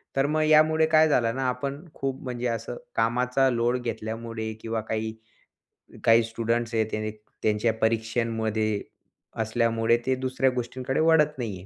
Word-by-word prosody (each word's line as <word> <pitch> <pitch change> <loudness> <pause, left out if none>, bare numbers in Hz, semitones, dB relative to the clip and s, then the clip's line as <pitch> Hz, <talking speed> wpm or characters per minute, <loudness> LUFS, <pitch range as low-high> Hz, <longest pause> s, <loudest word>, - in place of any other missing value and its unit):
तर 135 - +3
मग 155 +1 +1
यामुळे 155 +1 +5
काय 155 0 +5
झालं 115 -5 +2
ना 135 - -2
आपण 140 +4 -4
खूप 135 -1 -4
म्हणजे 125 -1 -3
असं 115 +1 -3 0.2
कामाचा 125 +3 +2
लोड 120 0 +1
घेतल्यामुळे 110 -1 -4
किंवा 115 0 -2
काही 110 0 -2 0.9
काही 115 0 +6
स्टुडंट्स 115 +1 -2
आहेत 110 -1 +2
त्याने 110 0 -2 0.3
त्यांच्या 110 +1 +2
परीक्षांमध्ये 110 -1 0 0.6
असल्यामुळे 115 0 +2
ते 130 - +2
दुसऱ्या 130 +1 0
गोष्टींकडे 125 +1 -3
वळत 155 -2 +4
नाही 115 -7 -4
आहे. 90 - -12
115 Hz, 145 wpm, -26 LUFS, 110-130 Hz, 0.9 s, काही